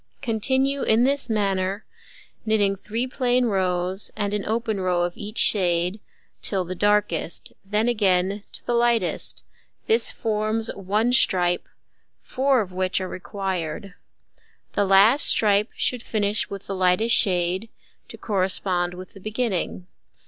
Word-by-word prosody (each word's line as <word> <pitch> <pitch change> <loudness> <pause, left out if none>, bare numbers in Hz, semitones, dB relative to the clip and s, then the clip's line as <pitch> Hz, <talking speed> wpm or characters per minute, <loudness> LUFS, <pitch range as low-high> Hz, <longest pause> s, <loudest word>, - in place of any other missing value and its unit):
Continue 265 +4 0
in 220 +2 +3
this 275 0 +1
manner, 195 -2 -1 0.6
knitting 210 -3 +2
3 225 +5 -3
plain 250 -1 +1
rows, 185 -2 -1
and 205 -1 -2
an 210 -1 -1
open 220 -1 -1
row 180 -1 +1
of 175 0 -3
each 210 +2 -7
shade, 180 0 +2 0.4
till 190 -3 +1
the 180 - -5
darkest; 205 -4 0
then 210 +3 0
again 200 -3 +1
to - - -11
the 240 - -1
lightest: 235 -5 0 0.4
this 450 +1 +2
forms 220 0 -2
1 210 +5 0
stripe, 180 -7 +2 0.5
4 265 -1 +1
of 190 -3 -6
which 185 0 0
are 185 - -4
required. 185 -2 -5 0.8
The 205 - +1
last 200 +8 +5
stripe 210 0 +3
should 250 -2 -1
finish 210 -2 -1
with 200 -1 -7
the 195 - -5
lightest 185 +5 +3
shade, 185 +1 +1 0.4
to - - -10
correspond 185 -3 0
with 185 +1 -10
the 195 - -12
beginning. 215 -4 -2
205 Hz, 135 wpm, -23 LUFS, 185-225 Hz, 0.8 s, last